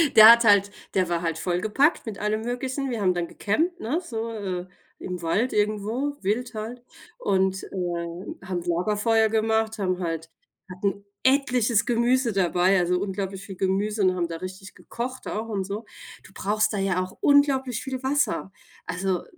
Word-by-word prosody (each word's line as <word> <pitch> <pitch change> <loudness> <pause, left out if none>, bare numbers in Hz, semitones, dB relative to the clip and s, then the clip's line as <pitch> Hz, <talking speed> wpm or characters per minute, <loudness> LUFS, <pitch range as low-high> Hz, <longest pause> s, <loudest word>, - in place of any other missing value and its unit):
der 220 +1 +12
hat 235 0 +6
halt 205 -2 +5 0.2
der 185 -2 +1
war 170 -1 0
halt 165 -1 -1
vollgepackt 210 - +1
mit 220 -3 -6
allem 210 +1 -1
möglichen. 260 +3 -3
Wir 230 -3 -3
haben 185 -2 +3
dann 175 -1 -1
gecampt, 330 - -1
ne, 285 +6 -1
so, 230 -9 -4
äh, 185 -4 -4 0.3
im 180 -1 -5
Wald 210 +10 +1
irgendwo 215 +7 0
wild 230 +6 -1
halt 230 +3 -6 0.3
und, 190 -1 +1
ähm, 175 -1 -4
haben 180 -2 -2
Lagerfeuer 210 +6 +2
gemacht, 220 0 +1
haben 185 -2 0
halt 165 -2 -3 0.4
hatten 195 +2 -2 0.2
etliches 250 -5 +3
Gemüse 240 +1 +2
dabei, 185 0 +3
also, 180 0 +1
unglaublich 195 0 -4
viel 195 - -8
Gemüse 200 +3 0
und 185 -1 +4
haben 175 -2 -1
da 165 -1 -5
richtig 185 +2 -8
gekocht 255 +2 -6
auch 220 +2 -3
und 200 -3 -1
so. 205 +3 -5 0.4
Du - - -16
brauchst 210 +2 +1
da - - -1
ja 195 -2 +1
auch 185 - -10
unglaublich 270 -4 +3
viel 260 -2 -4
Wasser. 275 -7 0 0.3
Also, 180 0 -1
205 Hz, 165 wpm, -25 LUFS, 185-235 Hz, 0.4 s, der